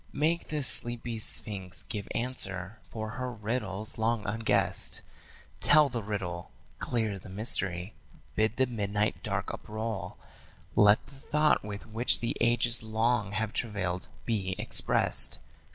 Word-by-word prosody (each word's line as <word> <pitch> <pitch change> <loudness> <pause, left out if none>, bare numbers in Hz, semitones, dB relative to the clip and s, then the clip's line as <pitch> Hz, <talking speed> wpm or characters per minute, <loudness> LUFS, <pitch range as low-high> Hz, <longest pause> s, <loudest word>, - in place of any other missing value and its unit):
Make 160 +4 0
the 150 -2 -3
sleepy 120 -2 0
sphinx 95 -4 -4
give 105 -3 -6
answer, 110 -4 0
for 110 -1 -5
her 125 +1 -4
riddle's 105 -2 -4
long 110 -1 0
unguessed. 110 +2 +1 0.6
Tell 150 -2 +6
the 120 -3 -4
riddle; 95 -5 -5 0.3
clear 110 -4 -1
the 95 - -13
mystery; 95 -2 +1 0.4
bid 110 +1 +1
the 130 - +3
midnight 105 -3 -2
dark - - -3
uproll; 110 -1 -5 0.6
Let 105 +1 +5
the 140 - -17
thought 150 +1 +1
with 105 -1 -7
which 115 +2 +2
the 115 - -2
ages 120 0 +3
long 110 -1 0
have 110 +1 -2
travailed 95 -7 -3 0.2
be 95 -4 -2
expressd. - - +6
110 Hz, 130 wpm, -29 LUFS, 100-120 Hz, 0.6 s, Tell